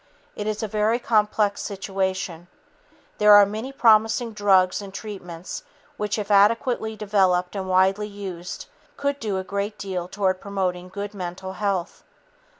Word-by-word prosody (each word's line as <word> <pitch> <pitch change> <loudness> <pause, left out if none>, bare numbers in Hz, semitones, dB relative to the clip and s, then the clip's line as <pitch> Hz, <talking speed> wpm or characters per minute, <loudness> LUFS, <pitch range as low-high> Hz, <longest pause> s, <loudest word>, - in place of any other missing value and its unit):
It 210 - -4
is 215 0 -2
a - - -1
very 215 +2 +1
complex 210 -3 +1
situation. 190 -3 -3 0.7
There 210 0 +7
are 205 0 +9
many 220 +6 -5
promising 225 -2 +3
drugs 195 -2 +3
and 200 -1 -8
treatments 185 - -7 0.3
which, 210 0 -2
if 210 -1 -3
adequately 220 +2 +3
developed 195 -3 +1
and 190 -1 -4
widely 190 +3 +3
used, 190 -4 -7 0.3
could 280 0 -1
do 210 -5 -2
a 190 - -2
great 200 +2 -3
deal 185 -3 -4
toward 185 -1 -1
promoting 185 -3 -2
good 200 +2 -6
mental 190 0 -6
health. 190 -2 -2
200 Hz, 145 wpm, -24 LUFS, 185-210 Hz, 0.7 s, are